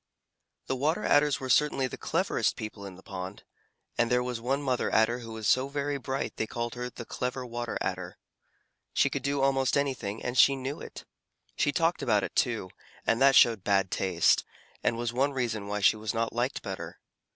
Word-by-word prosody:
The 130 - -1
Water 155 +10 0
Adders 145 -1 +3
were 130 - -5
certainly 135 +1 +3
the 130 - -4
cleverest - - 0
people 105 -2 -7
in 95 - -10
the 95 - -15
pond, 95 0 -7 0.6
and 120 -1 +3
there 125 0 +2
was 125 -2 -4
one 135 +4 0
Mother 130 -3 0
Adder 110 +3 +3
who 115 -2 -9
was 110 -1 -3
so 130 +1 +3
very 140 0 -2
bright 135 +1 -3
that - - -45
they 110 - -1
called 120 +1 -3
her 125 0 -4
"the 120 -1 -9
Clever 125 +2 -3
Water 120 0 -4
Adder." - - -4 0.8
She - - +3
could - - -2
do 140 0 0
almost 135 0 +2
anything, 130 -7 -2
and 125 - -3
she 140 +2 +6
knew 135 +2 -5
it. - - -9 0.5
She 145 - +2
talked 165 +4 +1
about 105 -5 +2
it, - - -5
too, 110 -7 0 0.3
and 115 +2 +1
that 135 0 +6
showed 115 -5 +6
bad 95 -2 +2
taste, 95 - +2 0.4
and 115 - +1
was 120 0 -2
one 140 +3 +1
reason 115 -6 -2
why 105 0 -2
she 105 - +5
was 110 +2 -3
not 115 0 -1
liked 120 +3 -1
better. - - -6
125 Hz, 205 wpm, -29 LUFS, 110-135 Hz, 0.8 s, she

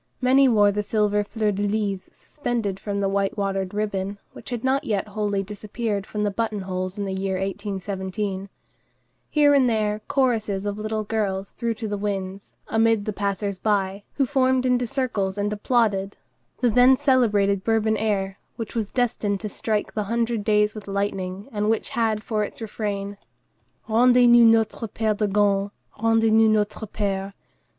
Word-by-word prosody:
Many 265 +1 +5
wore 205 -3 +5
the 210 +1 -1
silver 210 0 +1
fleur 210 0 -1
de 200 0 -3
lys 205 -2 -1
suspended 230 -9 -4
from 200 0 -3
the 195 - +1
white 195 +1 0
watered 195 -2 -1
ribbon, 200 -1 -2 0.2
which - - -10
had 240 -2 -4
not 265 +1 +1
yet 210 -1 -2
wholly 205 -1 -1
disappeared 210 +1 -4
from 210 -1 -3
button 210 0 -1
holes 185 0 -4
in 200 - -2
the 190 - -3
year 190 0 -2
1817. 195 0 -4 0.8
Here 290 -1 +4
and 265 -3 +4
there 215 -1 0
choruses 220 -7 0
of 205 0 -3
little 215 0 -2
girls 200 -3 -2
threw 235 -1 -2
to 220 0 -5
the 205 -1 -3
winds, 195 -1 -4
amid 225 -2 +2
the 215 - -2
passers 200 -1 -2
by, 200 -1 0
who 275 - +2
formed 260 -1 +2
into 250 -1 +2
circles 210 -7 -1
and 205 +1 -1
applauded, 205 -3 0 0.4
the 245 -2 +3
then 250 +3 +6
celebrated 210 -8 +2
Bourbon 220 -1 +2
air, 195 -3 -1 0.2
which 225 -2 -6
was 220 -3 -2
destined 225 -5 0
to 215 - -4
strike 210 +1 -2
the 210 -1 -2
Hundred 230 0 -1
Days 210 0 +2
with 215 -2 -9
lightning, 195 -1 -3
and 210 -1 -1
which 225 - 0
had 220 -2 0
for 215 -3 -1
its 205 - -6
refrain:— 205 -2 -4 0.7
"Rendez 245 +2 +5
nous 240 0 +7
notre 225 +1 +1
père 215 0 -1
de 210 - +1
Gand, 200 0 +2 0.3
Rendez 225 0 +3
nous 220 0 +5
notre 215 0 0
père." 195 -1 -3
210 Hz, 170 wpm, -24 LUFS, 200-225 Hz, 0.8 s, nous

